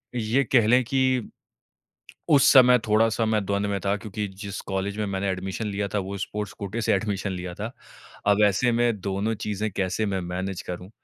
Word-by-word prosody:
ये 120 +4 +1
कह 115 -4 +5
लें 125 +2 +5
कि 130 -1 +1 1.0
उस 140 -2 +6
समय 125 -2 +8
थोड़ा-सा 110 +1 +3
मैं 110 -2 +1
द्वंद 100 +1 0
में 100 -1 -1
था 100 +1 +2
क्योंकि 105 0 -5
जिस 100 -1 -5
कॉलेज 95 +1 -2
में 105 - 0
मैंने 100 0 -2
एडमिशन 95 +3 -3
लिया 100 0 -2
था - - +2
वो 100 +1 -5
स्पोर्ट्स 105 +1 -4
कोटे 100 +3 -4
से - - +2
एडमिशन 100 -1 -1
लिया 90 -1 -5
था। 110 +3 -5 0.6
अब 105 +1 +4
ऐसे 110 +5 +2
में 120 -3 +1
दोनों 100 +3 -1
चीज़ें 105 +1 -2
कैसे 95 +3 -1
मैं 95 -2 -1
मैनेज 95 +1 -3
करूँ? 90 +1 -7
105 Hz, 190 wpm, -25 LUFS, 95-115 Hz, 1.0 s, समय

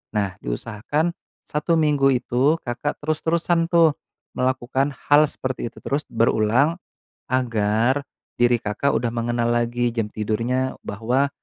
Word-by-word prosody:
nah, 100 -3 0
diusahakan 115 - -2 0.3
1 150 +3 0
minggu 145 -3 +3
itu 130 +4 +2
Kakak 125 +4 -3
terus-terusan 165 +2 +1
tuh 165 -3 +5 0.4
melakukan 130 +2 0 0.2
hal 145 +1 +7
seperti 130 -3 -4
itu - - -15
terus 145 +2 -1
berulang, 115 +7 +2 0.5
agar 120 +1 +1 0.3
diri 120 0 +4
Kakak 105 +7 -1
udah 120 - 0
mengenal 120 0 0
lagi 120 +1 0
jam 110 -3 -1
tidurnya 115 +5 -1
bahwa 120 +7 0
125 Hz, 120 wpm, -23 LUFS, 115-145 Hz, 0.5 s, hal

